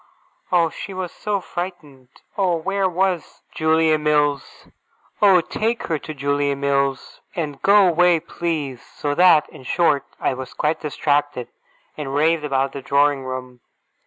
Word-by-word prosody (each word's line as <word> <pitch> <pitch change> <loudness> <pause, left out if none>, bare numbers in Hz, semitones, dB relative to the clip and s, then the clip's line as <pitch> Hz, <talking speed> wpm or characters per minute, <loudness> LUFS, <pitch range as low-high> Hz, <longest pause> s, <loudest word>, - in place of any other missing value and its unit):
Oh, 170 -3 +3
she 195 - -8
was 185 -2 -4
so 205 -1 -2
frightened! 175 -8 -7 0.3
Oh, 185 -3 +1
where 195 +3 0
was 185 -1 -2
Julia 160 0 +2
Mills! 150 -2 0 0.6
Oh, 195 -4 +6
take 225 +7 -2
her 160 -2 -2
to 155 - -8
Julia 140 0 0
Mills, 140 -1 -1
and 150 -5 -4
go 200 0 +6
away, 175 0 +4
please! 155 -6 -4
So 145 -1 -4
that, 170 -2 +5
in - - -13
short, 145 +1 +1 0.2
I - - 0
was 130 0 -8
quite 155 +1 0
distracted, 145 -3 -1 0.5
and 140 -2 -4
raved 160 +2 +2
about 135 -2 0
the 140 - -7
drawing 140 0 +2
room. 130 -1 -6
150 Hz, 145 wpm, -21 LUFS, 140-175 Hz, 0.6 s, Oh